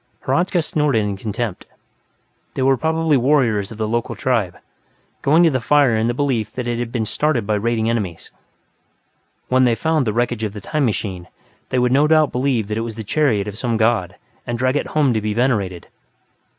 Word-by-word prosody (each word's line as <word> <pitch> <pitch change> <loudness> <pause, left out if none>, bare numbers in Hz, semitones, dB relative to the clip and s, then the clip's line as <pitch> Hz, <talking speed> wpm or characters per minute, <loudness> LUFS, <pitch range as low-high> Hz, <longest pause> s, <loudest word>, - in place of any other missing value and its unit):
Hradzka 175 +5 +1
snorted 150 -7 +1
in 100 -1 -2
contempt; 110 0 -4 0.9
they 130 - -1
were 135 0 +4
probably 160 +1 +1
warriors 120 -7 +1
of 110 - -9
the 110 -1 -1
local 120 +2 -2
tribe, 110 -9 -1 0.6
going 155 +5 +4
to 165 - +4
the 130 -2 -1
fire 140 -2 +3
in 110 +1 +1
the 120 - -1
belief 125 -7 -1
that 125 - -4
it 120 -1 -2
had 120 -1 -3
been 115 -3 -1
started 140 -1 0
by 105 - 0
raiding 110 +1 0
enemies. 105 -8 -3 1.2
When 130 0 +3
they 120 -2 +3
found 155 +2 0
the 105 - 0
wreckage 120 -1 -1
of 105 -2 -2
the 105 - -7
"time 150 +5 -1
machine", 95 -5 -3 0.4
they 130 - -1
would 125 0 +2
no 145 +3 +4
doubt 155 -2 +4
believe 125 -4 0
that 105 +1 -2
it - - -1
was 115 -1 -5
the 110 - -6
chariot 110 -4 +1
of 105 +1 -7
some 120 -2 -1
god 110 -5 +1 0.3
and 120 0 -2
drag 130 +2 +1
it 145 - -1
home 145 -5 +2
to 110 - 0
be 105 0 -2
venerated. 105 -8 0
120 Hz, 205 wpm, -20 LUFS, 110-135 Hz, 1.2 s, were